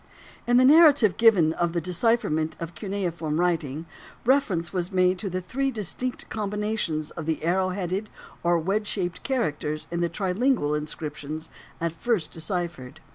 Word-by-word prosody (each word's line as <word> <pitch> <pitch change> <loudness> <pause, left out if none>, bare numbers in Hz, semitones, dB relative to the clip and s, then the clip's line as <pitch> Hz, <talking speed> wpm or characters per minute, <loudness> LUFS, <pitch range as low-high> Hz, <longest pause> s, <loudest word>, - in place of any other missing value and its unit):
In 240 0 +5
the 255 - +6
narrative 290 - +7
given 195 -9 +5
of 170 0 -1
the 170 - +1
decipherment 180 -2 0
of 165 +1 -6
cuneiform 170 -4 -3
writing 165 -4 0 0.4
reference 205 -11 +2
was 180 -1 -2
made 185 -1 +2
to 195 - -3
the 185 +1 -3
three 270 +10 -1
distinct 245 +2 -3
combinations 210 -7 -2
of 160 -2 -7
the 160 -1 -1
arrow 185 +3 +2
headed 190 +2 -3 0.3
or 175 0 +3
wedge 195 +6 -1
shaped 180 -4 -2
characters 155 - -2
in 170 0 -1
the 170 - +1
trilingual 190 - +1
inscriptions 150 +1 -5 0.3
at 170 0 -1
first 185 0 -1
deciphered. 165 -6 -4
180 Hz, 150 wpm, -26 LUFS, 160-215 Hz, 0.4 s, narrative